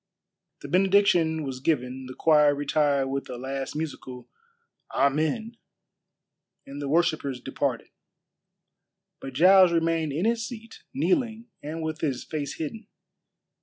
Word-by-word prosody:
The - - -7
benediction 180 -2 +3
was 135 -2 -5
given, 130 -3 -1
the 130 - -9
choir 150 -2 +4
retired 145 -1 +1
with 135 0 -4
a 125 - -6
last 135 +2 -5
musical 130 -5 -6 0.6
"Amen," 160 - 0 1.1
and 140 +1 -8
the 140 - -3
worshippers 155 -5 +1
departed. - - -3 1.3
But 135 - -8
Giles 185 +5 +6
remained 165 -2 0
in 160 +8 -1
his 230 0 +1
seat, 230 -1 -9
kneeling 245 -5 -1
and 160 +2 -5
with 160 +1 -4
his 135 -6 -1
face 145 -3 -4
hidden. 205 +8 -6
155 Hz, 125 wpm, -26 LUFS, 140-185 Hz, 1.3 s, Giles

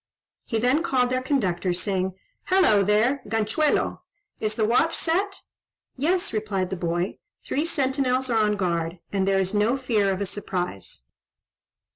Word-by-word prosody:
He 225 - -1
then 250 +7 +2
called 250 -6 +1
their 255 0 +1
conductor, 190 -10 0
saying, 185 0 -1 0.3
"Hallo! 365 - +4
there, 215 +7 +2
Ganchuelo! 225 +8 0 0.4
Is 215 0 -1
the 220 - +1
watch 280 +9 +2
set?" 390 +4 0 0.5
"Yes," 345 +5 0
replied 205 -4 -2
the - - -1
boy; 175 +1 -2 0.2
"three 300 +4 -1
sentinels 265 -4 +1
are 230 -3 +2
on 210 -1 +2
guard, 170 -3 -1 0.2
and 195 -1 +1
there 195 0 +3
is 190 +1 -1
no 215 +5 +2
fear 220 -7 +1
of 190 - -2
a 200 - -1
surprise." 180 - -4
215 Hz, 150 wpm, -25 LUFS, 190-265 Hz, 0.5 s, Hallo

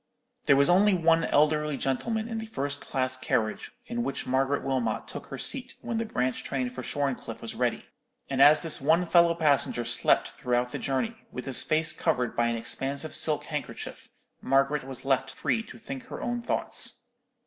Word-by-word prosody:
There 140 - +7
was 140 +1 +4
only 195 +3 +5
one 165 -1 +3
elderly 150 0 +2
gentleman 220 - -1
in 225 -1 -4
the 220 - -6
first 145 -8 -3
class 130 -1 -1
carriage 115 -4 -1 0.2
in 240 +1 -3
which 140 - -3
Margaret 135 +2 0
Wilmot 130 -5 -1
took - - -8
her - - -7
seat 265 -1 -2
when 230 -1 -3
the 230 - -1
branch 130 - -1
train 130 -2 -2
for 130 - -7
Shorncliffe 140 0 -3
was - - -6
ready; - - -1 0.4
and 135 -1 0
as 150 +2 +7
this 165 -4 -2
one 160 +5 +3
fellow 170 0 +4
passenger 145 -6 +1
slept 120 - +2
throughout 125 0 -1
the - - -4
journey, 220 - -3
with 125 - -6
his 130 -1 +2
face 155 +4 +1
covered 125 -7 -1
by 120 - +2
an 115 - 0
expansive 140 +6 -2
silk 155 -2 +3
handkerchief, 150 -2 -6 0.3
Margaret 135 +2 +2
was 135 -1 -9
left 135 -1 +1
free 225 - -1
to - - -12
think 260 +2 -8
her - - -8
own 240 0 -2
thoughts. - - +2
145 Hz, 185 wpm, -27 LUFS, 130-170 Hz, 0.4 s, There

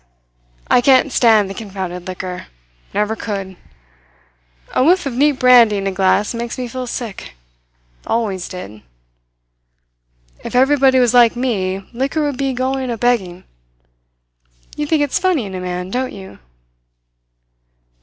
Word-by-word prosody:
I 245 - +4
can't 260 +2 +4
stand 220 -5 +4
the 195 - -6
confounded 190 -4 -6
liquor. 185 0 -6 0.4
Never 210 +2 -1
could. 195 -4 -5 1.2
A - - +2
whiff 360 +4 +3
of 275 - -3
neat 290 +4 +3
brandy 245 -5 +5
in 195 - -3
a 195 - 0
glass 190 +3 +1
makes 235 0 -5
me 250 -1 -4
feel 255 +1 -6
sick. 225 - -6 0.7
Always 200 -6 -1
did. 110 - -9 1.6
If - - -6
everybody 265 0 +4
was 245 -2 +3
like 240 -2 +5
me, 195 -6 -2
liquor 275 +6 -1
would 290 -3 -2
be 275 0 -1
going 260 +1 -2
a 235 - -3
begging. 195 -7 0 1.3
You 295 - -3
think 305 -1 +2
it's 290 +7 -1
funny 365 - +1
in 195 - -8
a 185 - -4
man, 180 0 -5
don't 255 +2 -2
you?" 190 -1 -11
235 Hz, 140 wpm, -18 LUFS, 190-260 Hz, 1.6 s, brandy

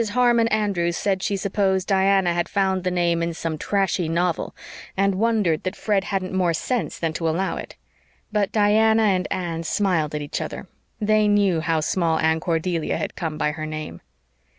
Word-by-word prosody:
Harmon 240 -2 +4
Andrews 195 -6 0
said 195 -2 0
she 200 - -1
supposed 190 -1 0
Diana 195 -2 +3
had 175 0 -1
found 190 -2 0
the 185 - +1
name 175 -2 +1
in 170 0 -2
some 165 -1 -3
trashy 195 -4 0
novel, 170 0 -1 0.4
and 195 0 +2
wondered 205 -6 +1
that 185 - -3
Fred 200 -3 0
hadn't 190 -1 -2
more 180 -3 +1
sense 245 +8 -2
than 165 -2 -2
to 165 0 -1
allow 185 +5 -1
it. - - -8 0.6
But 210 -2 0
Diana 220 +1 +4
and 190 -3 +2
Anne 170 -3 -3
smiled 165 -4 0
at 150 - -3
each 145 - -4
other. - - -6 0.3
They 215 0 +3
knew 200 -5 +3
how 165 -1 0
Small 165 0 +1
Anne 160 0 +2
Cordelia 165 0 -1
had - - -4
come 160 -4 -4
by 150 - 0
her 155 0 -5
name. 155 - -6
185 Hz, 180 wpm, -23 LUFS, 165-200 Hz, 0.6 s, Harmon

